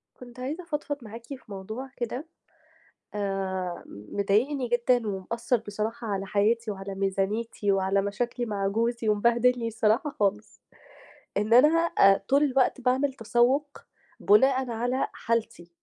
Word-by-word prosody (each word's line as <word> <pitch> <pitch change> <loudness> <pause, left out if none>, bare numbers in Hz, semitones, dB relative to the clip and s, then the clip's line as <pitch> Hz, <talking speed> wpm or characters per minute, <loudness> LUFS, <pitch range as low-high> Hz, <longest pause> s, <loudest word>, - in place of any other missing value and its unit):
كنت 245 0 -13
عايزة 295 +8 -4
أفضفض 295 -3 -3
معاكِ 230 +1 -10
في 275 +2 -7
موضوع 220 +6 -7
كده 250 +5 -4 0.9
آآ 190 -3 -3
مضايقني 205 - -1
جدًا 240 0 +2
ومأثّر 225 +6 -1
بصراحة 215 +3 -4
على 195 -2 -2
حياتي 215 +3 +1
وعلى 195 -1 -6
ميزانيتي 195 +2 -1
وعلى 195 0 +1
مشاكلي 240 +5 -2
مع 200 -3 -1
جوزي 230 +2 -1
ومبهدلني 235 +3 +2
الصراحة 225 +6 +1
خالص. 210 +1 -1 0.8
إن 210 +3 +2
أنا 300 +7 +6 0.2
آآ 195 0 +5
طول 280 +2 +4
الوقت 265 -2 +2
باعمل 260 +3 +1
تسوُّق 260 +4 +1 0.4
بُناءً 260 +4 +4
على 245 +3 -1
حالتي. 225 -7 -3
230 Hz, 125 wpm, -27 LUFS, 200-250 Hz, 0.9 s, أنا